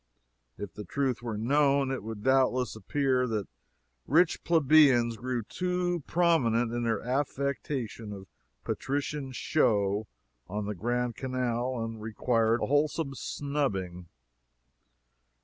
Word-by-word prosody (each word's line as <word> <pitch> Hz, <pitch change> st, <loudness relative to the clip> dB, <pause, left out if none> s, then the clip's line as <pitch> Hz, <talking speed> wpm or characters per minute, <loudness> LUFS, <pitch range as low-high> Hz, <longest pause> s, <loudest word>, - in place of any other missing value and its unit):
If 100 Hz, -5 st, -7 dB
the 105 Hz, -, -7 dB
truth 130 Hz, 0 st, -1 dB
were 115 Hz, -3 st, -4 dB
known, 140 Hz, +3 st, +2 dB
it 135 Hz, -, -2 dB
would 110 Hz, 0 st, -7 dB
doubtless 130 Hz, -2 st, +2 dB
appear 130 Hz, +1 st, 0 dB
that 110 Hz, -4 st, -2 dB, 0.6 s
rich 165 Hz, +3 st, +3 dB
plebeians 140 Hz, -7 st, +5 dB
grew 125 Hz, 0 st, -3 dB
too 180 Hz, -, -1 dB
prominent 120 Hz, -10 st, +2 dB
in 120 Hz, -, -1 dB
their 115 Hz, -3 st, 0 dB
affectation 130 Hz, -3 st, -2 dB
of 100 Hz, -2 st, -8 dB, 0.4 s
patrician 140 Hz, 0 st, -3 dB
show 105 Hz, -7 st, +1 dB, 0.4 s
on 105 Hz, +2 st, -3 dB
the 105 Hz, -, -2 dB
Grand 120 Hz, +4 st, -1 dB
Canal, 125 Hz, -1 st, -2 dB
and 115 Hz, -1 st, -5 dB
required 115 Hz, +1 st, +1 dB
a -, -, +2 dB
wholesome 145 Hz, 0 st, +1 dB
snubbing. 100 Hz, -13 st, -3 dB
125 Hz, 115 wpm, -29 LUFS, 110-140 Hz, 0.6 s, plebeians